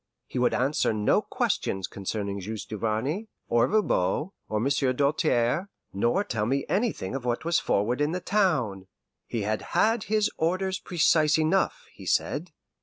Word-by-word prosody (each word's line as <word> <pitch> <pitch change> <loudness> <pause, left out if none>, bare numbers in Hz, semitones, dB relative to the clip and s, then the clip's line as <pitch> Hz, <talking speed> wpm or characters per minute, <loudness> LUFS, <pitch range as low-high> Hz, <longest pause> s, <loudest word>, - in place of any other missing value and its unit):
He 125 - -4
would 125 - +2
answer 135 -2 +1
no 105 -1 +2
questions 95 -1 -1
concerning 100 +1 -4
Juste 105 +1 -6
Duvarney, 115 - -2 0.2
or 115 0 +4
Voban, 170 - +1 0.2
or 110 - 0
Monsieur 135 +1 +1
Doltaire, 145 +3 +1 0.2
nor 120 - +1
tell 110 - -2
me 135 +2 0
anything 200 - -1
of 135 -2 -3
what 120 +4 -2
was 170 +1 +3
forward 120 - 0
in 145 +1 +2
the 180 - -2
town. 150 - 0 0.4
He 115 -3 -2
had 110 +1 -1 0.2
had 225 0 +3
his 215 -1 +1
orders 185 +3 0
precise 160 -3 +3
enough, 190 - +1
he - - -11
said. - - 0
135 Hz, 155 wpm, -27 LUFS, 110-180 Hz, 0.4 s, or